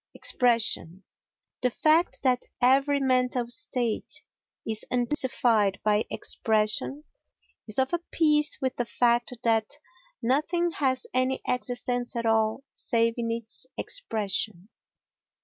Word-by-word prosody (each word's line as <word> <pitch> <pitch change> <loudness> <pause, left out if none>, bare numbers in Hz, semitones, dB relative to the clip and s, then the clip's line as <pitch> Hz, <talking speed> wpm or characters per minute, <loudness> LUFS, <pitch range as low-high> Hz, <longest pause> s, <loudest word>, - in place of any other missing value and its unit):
Expression 225 -7 +1 0.6
The 250 - +2
fact 310 +7 +1
that 250 -2 +1
every 275 +3 +3
mental 255 -2 +1
state 240 - -1 0.4
is 220 -1 -1
intensified 240 -5 +1
by 210 0 +2
expression 220 +6 0 0.6
is 215 - -2
of 265 +4 +1
a 345 - +1
piece 300 -1 +3
with 260 -2 -2
the 245 - -1
fact 240 +1 +1
that 225 -2 +1 0.4
nothing 310 +8 0
has 260 -4 0
any 255 +1 +1
existence 245 0 -2
at 235 -1 -2
all 220 +3 +1
save 230 -1 +1
in 230 -1 -2
its 230 +2 -2
expression. 210 - -1
245 Hz, 115 wpm, -27 LUFS, 225-265 Hz, 0.6 s, every